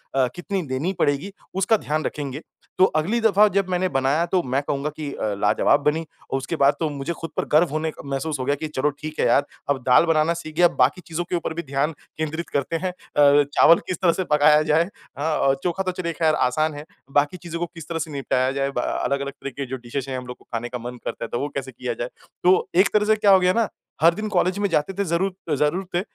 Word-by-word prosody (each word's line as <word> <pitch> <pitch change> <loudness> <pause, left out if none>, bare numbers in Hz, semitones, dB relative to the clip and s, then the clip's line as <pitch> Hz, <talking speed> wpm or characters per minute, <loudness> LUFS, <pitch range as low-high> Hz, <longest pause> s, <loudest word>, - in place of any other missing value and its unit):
अ, 130 -2 +3
कितनी 190 +2 -3
देनी 135 +9 -1
पड़ेगी 145 +8 0 0.2
उसका 195 +4 +3
ध्यान 155 -4 -2
रखेंगे। 145 0 -4 0.4
तो 185 - +8
अगली 180 +10 +1
दफ़ा 210 -1 +5
जब 195 -1 0
मैंने 185 +1 +1
बनाया 135 +3 +1
तो 185 - +3
मैं 130 +2 0
कहूँगा 140 +1 -2
कि 150 -2 -4
अ, 105 -1 -2
लाजवाब 145 - +3
बनी 155 +3 +1 0.3
और 135 - +1
उसके 135 +5 -3
बाद 140 -1 +4
तो 160 - 0
मुझे 145 +3 -4
खुद 165 -1 -5
पर - - 0
गर्व 155 +2 +5
होने 155 +1 -1
क - - -13
महसूस 140 +2 -3
हो 130 - -2
गया 140 +2 +2
कि 155 +2 -5
चलो 150 -1 0
ठीक 155 0 -6
है - - +3
यार 140 - +3 0.2
अब 135 -2 +1
दाल 125 +6 +6
बनाना 165 0 +2
सीख 155 -2 -8
गया 175 +2 +6 0.2
बाकी 140 +8 +1
चीज़ों 170 0 -2
के - - 0
ऊपर 170 -1 -2
भी 170 +1 -4
ध्यान 140 +1 -1 0.3
केंद्रित 160 +1 -3
करते 140 +3 -1
हैं। 185 - 0
अ, 145 -4 +3
चावल 165 - +6
किस 185 - -2
तरह 180 -2 +5
से - - +2
पकाया 150 +1 +5
जाए। 160 +3 +2 0.3
हाँ 155 +2 0
औ 135 - +3
चोखा 180 +2 -1
तो 185 - -1
चलिए 170 -1 -2
ख़ैर 155 -1 +2
आसान 155 +4 +1
है। 145 +1 -8 0.3
बाकी 145 +5 +2
चीज़ों 170 -1 -6
को 175 - 0
किस 165 -2 -9
तरह 165 -1 -2
से 160 0 -4
निपटाया 130 -2 0
जाए 135 0 -1
ब - - +3
अलग-अलग 140 0 -1
तरह - - -4
के 140 - -2
जो 130 +1 -5
डिशेज़ 130 +2 -5
है 130 - -3
हम 125 0 -7
लोग 125 - -7
को - - -24
खाने 115 +1 -3
का 125 - -4
मन 125 +1 -7
करता - - -4
है - - -9
तो 120 - -2
वो 145 - -2
कैसे 135 -1 -4
किया 120 0 -4
जाए? 120 +2 -4 0.3
तो 185 +1 +4
एक 185 +1 +5
तरह 210 0 +3
से 220 +1 +4
क्या 210 -2 +4
हो 190 - +7
गया 180 0 +3
ना 230 0 +2 0.3
हर 165 +2 +6
दिन 215 +4 -4
कॉलेज 185 -1 +1
में 205 - +2
जाते 165 +2 0
थे 200 - -1
ज़रू 170 +3 +1 0.3
ज़रूर 150 +7 0
थे - - +3
155 Hz, 255 wpm, -23 LUFS, 140-175 Hz, 0.4 s, तो